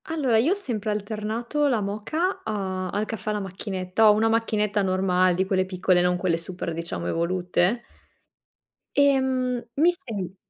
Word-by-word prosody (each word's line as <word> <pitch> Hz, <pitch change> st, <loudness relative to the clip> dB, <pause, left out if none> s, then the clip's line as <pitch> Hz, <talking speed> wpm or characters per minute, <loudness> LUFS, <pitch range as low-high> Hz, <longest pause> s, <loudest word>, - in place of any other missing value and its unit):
Allora, 275 Hz, -9 st, +1 dB
io 275 Hz, +10 st, +3 dB
ho -, -, +5 dB
sempre 230 Hz, -, -3 dB
alternato 220 Hz, +7 st, -1 dB
la 245 Hz, -5 st, +2 dB
moka 215 Hz, -, -2 dB
a 190 Hz, -4 st, -3 dB
al 205 Hz, +3 st, -1 dB
caffè 215 Hz, -1 st, -5 dB
alla 210 Hz, 0 st, -1 dB
macchinetta. 190 Hz, +2 st, +1 dB
Ho -, -, +7 dB
una 220 Hz, +2 st, +2 dB
macchinetta 215 Hz, -2 st, +1 dB
normale 185 Hz, -1 st, +2 dB
di 190 Hz, +2 st, +1 dB
quelle 190 Hz, -1 st, +1 dB
piccole, 185 Hz, -1 st, +2 dB
non 180 Hz, 0 st, +2 dB
quelle 180 Hz, -2 st, 0 dB
super, 175 Hz, 0 st, -5 dB
diciamo, 160 Hz, -, -4 dB
evolute. 180 Hz, -, 0 dB, 1.2 s
Ehm, 260 Hz, -3 st, +2 dB
mi 330 Hz, +5 st, +5 dB
sem 210 Hz, -, -5 dB
210 Hz, 155 wpm, -25 LUFS, 185-235 Hz, 1.2 s, Ho